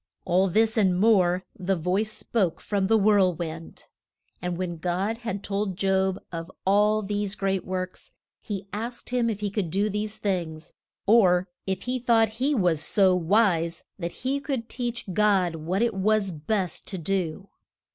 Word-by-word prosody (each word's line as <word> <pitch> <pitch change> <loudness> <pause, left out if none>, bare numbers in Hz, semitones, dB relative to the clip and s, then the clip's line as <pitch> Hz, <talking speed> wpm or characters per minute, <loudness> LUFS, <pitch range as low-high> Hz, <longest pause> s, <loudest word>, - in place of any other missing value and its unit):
All 185 +2 +3
this 220 +4 +2
and 185 -4 +3
more 185 -4 +3
the 190 +1 0
voice 185 +6 0
spoke 195 -6 -1
from 200 -2 -1
the 225 +2 +4
whirl 200 -4 +4
wind. 165 -1 -7 0.6
And 180 -1 -2
when 175 -2 -3
God 185 +7 -1
had 210 -5 -4
told 195 -2 -2
Job 190 -1 +1
of 165 0 -5 0.2
all 210 +2 +3
these 205 0 -2
great 195 -1 -1
works, 185 0 -5 0.3
he 200 -2 -5
asked 235 +4 -5
him 245 -2 +1
if 210 -2 -4
he 205 -1 -1
could 200 -5 -2
do 200 +5 0
these 210 +1 -3
things, 170 -6 -3 0.3
or 185 -4 +4 0.2
if 190 0 -2
he 255 +1 -2
thought 230 -2 +3
he 285 +2 +2
was 175 - +2
so 190 +1 +3
wise 175 -2 +2 0.2
that 170 -1 -3
he 275 +2 +1
could 270 -5 -4
teach 240 -1 -4
God 195 -4 +3
what 180 +7 -1
it 235 -1 +1
was 200 0 +1
best 180 +3 -2
to 190 - -4
do. 185 +1 -2
195 Hz, 165 wpm, -26 LUFS, 180-215 Hz, 0.6 s, the